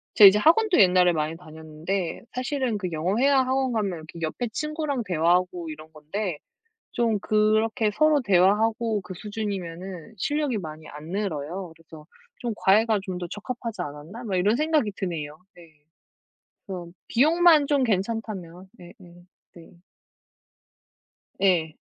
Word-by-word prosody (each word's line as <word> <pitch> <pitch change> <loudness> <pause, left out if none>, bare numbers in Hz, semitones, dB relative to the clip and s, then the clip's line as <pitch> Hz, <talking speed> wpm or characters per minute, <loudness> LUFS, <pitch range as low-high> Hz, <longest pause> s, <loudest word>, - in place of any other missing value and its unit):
제가 205 - +10
이제 205 +2 +1
학원도 365 - +4
옛날에 180 -2 +5
많이 155 0 -2
다녔는데 160 +2 -5
사실은 255 -3 -1
그 185 -2 -3
영어 175 +6 -1
회화 275 +2 +4
학원 260 -1 0
가면 205 -4 -1
이렇게 160 +2 -11
옆에 165 +10 -2
친구랑 305 -4 -2
대화하고 175 0 +1
이런 155 +1 -10
건데 160 +2 -4 0.5
좀 230 -3 +1
그렇게 215 +1 +2
서로 305 +1 +4
대화하고 215 +3 +2
그 185 - -9
수준이면은 190 -2 -6
실력이 290 +1 -1
많이 155 -3 -8
안 150 +2 -10
늘어요. 180 -2 -4
그래서 160 -1 -14 0.4
좀 240 -3 -2
'과외가 215 +2 +3
좀 185 -2 -5
더 175 - -4
적합하지 230 +1 -6
않았나?' 150 +12 -8
막 195 -4 -2
이런 205 +5 +2
생각이 305 -7 +1
드네요. 155 -5 -4 0.2
네. 170 -1 -15 1.0
그래서 180 -4 -6 0.2
비용만 315 +3 +5
좀 285 -2 +2
괜찮다면, 195 -4 -3
네네. 175 -1 -13 0.6
네. 170 - -14 1.7
예. 170 -5 +2
195 Hz, 300 characters per minute, -25 LUFS, 170-235 Hz, 1.7 s, 제가